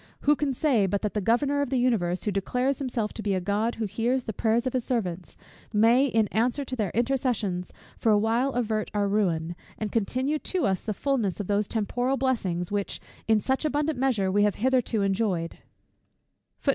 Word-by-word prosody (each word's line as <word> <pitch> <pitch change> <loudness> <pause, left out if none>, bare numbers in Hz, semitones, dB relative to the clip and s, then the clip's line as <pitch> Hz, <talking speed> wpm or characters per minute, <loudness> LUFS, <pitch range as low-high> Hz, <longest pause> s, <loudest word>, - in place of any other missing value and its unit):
Who 295 +1 +4
can 290 -1 -1
say 240 -9 +2
but 200 +3 -1
that 210 - -1
the 210 - -1
Governor 275 +7 +2
of 285 - -1
the 265 - 0
universe, 205 -8 +1
who 210 - 0
declares 250 +8 0
himself 240 -6 -2
to - - -5
be 200 -2 0
a - - +1
God 205 +5 0
who 225 - -2
hears 235 +6 0
the 220 - -4
prayers 230 +4 +1
of 255 - -1
his 255 -2 0
servants, 185 -9 -3 0.3
may, 230 +5 +4
in 225 -4 +2
answer 245 +6 0
to 255 - -4
their 210 -6 -1
intercessions, 235 -7 0 0.3
for 225 - +3
a 210 - +5
while 230 +6 +1
avert 220 -3 -1
our 205 -1 +2
ruin, 175 -5 0 0.2
and 215 -1 -3
continue 255 +7 0
to 370 +2 -1
us 190 -3 0
the 215 -3 -3
fulness 235 -9 -1
of 205 - -2
those 205 +1 +1
temporal 245 +4 -1
blessings, 190 -10 -1
which 205 -1 -2 0.3
in 220 -1 +4
such 265 +7 -1
abundant 295 -2 0
measure 225 -8 +1
we 205 +2 +3
have 205 -1 +3
hitherto 245 -3 +1
enjoyed. 195 -4 -1
225 Hz, 195 wpm, -26 LUFS, 200-255 Hz, 0.3 s, a